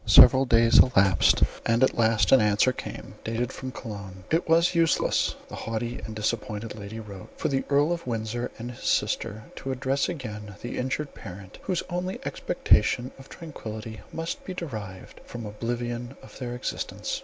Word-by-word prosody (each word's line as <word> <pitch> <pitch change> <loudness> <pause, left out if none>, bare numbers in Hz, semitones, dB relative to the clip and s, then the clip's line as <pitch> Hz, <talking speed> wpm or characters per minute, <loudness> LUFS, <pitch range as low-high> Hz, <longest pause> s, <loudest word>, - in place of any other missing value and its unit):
Several 125 +6 +9
days 115 -1 +6
elapsed, 95 -8 +5 0.2
and 115 +2 +3
at 130 - +3
last 115 -1 +3
an 135 - +8
answer 105 +4 +4
came, - - -7
dated 115 +3 -2
from 130 -1 -6
Cologne. 100 -6 -8
"It 165 +1 +1
was 165 +2 +5
useless," 165 -3 +2
the - - -14
haughty 115 +2 -3
and 110 - -6
disappointed 110 0 -2
lady 105 +1 -7
wrote, 100 -4 -9
"for - - -1
the 135 -1 0
Earl 145 +3 +3
of 170 -5 -3
Windsor 115 +1 -2
and 120 +2 -6
his 120 - -12
sister 110 +1 0
to 135 - -4
address 130 +2 0
again 105 - -6
the 120 - -4
injured 130 +3 -2
parent, 95 -2 -10
whose 185 -3 -1
only 180 +1 -3
expectation 125 +1 +2
of 135 - -13
tranquillity 110 - -7
must 165 0 -4
be 185 - -6
derived 105 - -7
from 120 -2 -7
oblivion 120 +3 -4
of - - -13
their 120 -2 -4
existence. 125 - -3
120 Hz, 165 wpm, -27 LUFS, 110-135 Hz, 0.2 s, Several